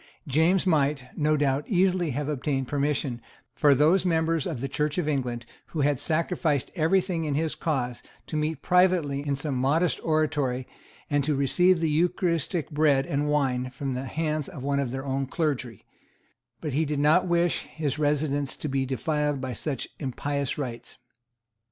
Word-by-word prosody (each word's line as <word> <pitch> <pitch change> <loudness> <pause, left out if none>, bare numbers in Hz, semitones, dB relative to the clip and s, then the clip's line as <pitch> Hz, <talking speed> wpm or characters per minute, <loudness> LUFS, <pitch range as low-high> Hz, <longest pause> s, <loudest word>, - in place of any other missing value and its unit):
James 160 +7 +3
might, 145 -6 +1
no 155 0 +2
doubt, 140 0 +1
easily 185 -3 +2
have 140 +2 -2
obtained 135 -2 -1
permission 140 -3 -1 0.3
for 145 -2 +4
those 160 +7 +4
members 165 -3 +1
of 155 -8 -4
the 135 - -2
Church 150 +3 -1
of 175 -4 0
England 125 -5 -2 0.2
who 155 - -3
had 140 -2 +2
sacrificed 160 -3 0
every 165 +3 +3
thing 180 -3 -2
in 150 -3 -1
his 160 +1 0
cause 125 -6 -2 0.2
to - - -6
meet 155 -1 -1
privately 180 -6 +3
in 140 -1 -1
some 140 +1 -3
modest 140 +4 +1
oratory, 145 -5 0 0.4
and 145 -1 +1
to 150 +1 +1
receive 175 +7 +3
the 165 - +1
eucharistic 170 0 0
bread 145 -3 +3
and 145 +2 -1
wine 130 -4 +1
from 135 +1 -4
the 130 +1 -4
hands 155 +1 -2
of 150 -9 -8
one 140 0 0
of 140 -3 -1
their 135 +2 -5
own 135 0 -1
clergy; 135 - -2 0.8
but 150 -4 -3
he 155 +4 +2
did 150 -1 -2
not 155 +6 +4
wish 175 0 +1
his 150 -2 -3
residence 145 -2 0
to - - -5
be 135 -1 -1
defiled 150 +1 -1
by 130 -1 -4
such 140 +2 -3
impious 140 0 -2
rites. 125 -5 -6
150 Hz, 170 wpm, -26 LUFS, 135-160 Hz, 0.8 s, for